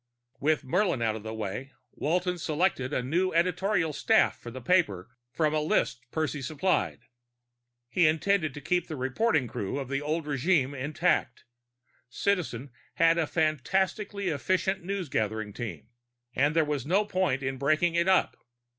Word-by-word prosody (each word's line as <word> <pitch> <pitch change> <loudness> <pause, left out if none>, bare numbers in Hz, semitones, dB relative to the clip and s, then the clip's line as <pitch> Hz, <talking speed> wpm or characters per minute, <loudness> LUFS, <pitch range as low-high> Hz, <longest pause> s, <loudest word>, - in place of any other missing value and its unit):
With 155 +2 +1
Murlin 175 - +1
out 110 -1 +1
of 110 - -6
the 110 +1 -6
way, 110 +5 -5 0.2
Walton 180 +3 -1
selected 155 -4 0
a 125 - -1
new 175 +8 0
editorial 175 0 +1
staff 220 +9 +3
for 120 - -10
the 130 +2 -7
paper 120 - +1 0.2
from 155 +1 +1
a 155 - +2
list 150 -4 +1
Percy 155 -1 -2
supplied. 155 -1 0 0.9
He 165 +6 +3
intended 160 -1 +1
to 145 - -7
keep 175 +4 0
the 155 - -5
reporting 135 - +1
crew 105 +1 -4
of 135 -2 -4
the 140 +1 -1
old 155 +2 -2
regime 145 -1 +1
intact; 145 -1 0 0.6
Citizen 145 - -1 0.2
had 165 0 +4
a 160 - +1
fantastically 190 - 0
efficient 185 +5 0
newsgathering 110 - -2
team, 115 0 -6 0.5
and 145 +4 +2
there 160 -1 +4
was 145 -2 -2
no 190 +8 +2
point 185 -9 0
in 135 0 -3
breaking 155 +5 +2
it 170 +1 +2
up. 190 -1 +3
155 Hz, 155 wpm, -28 LUFS, 130-180 Hz, 0.9 s, had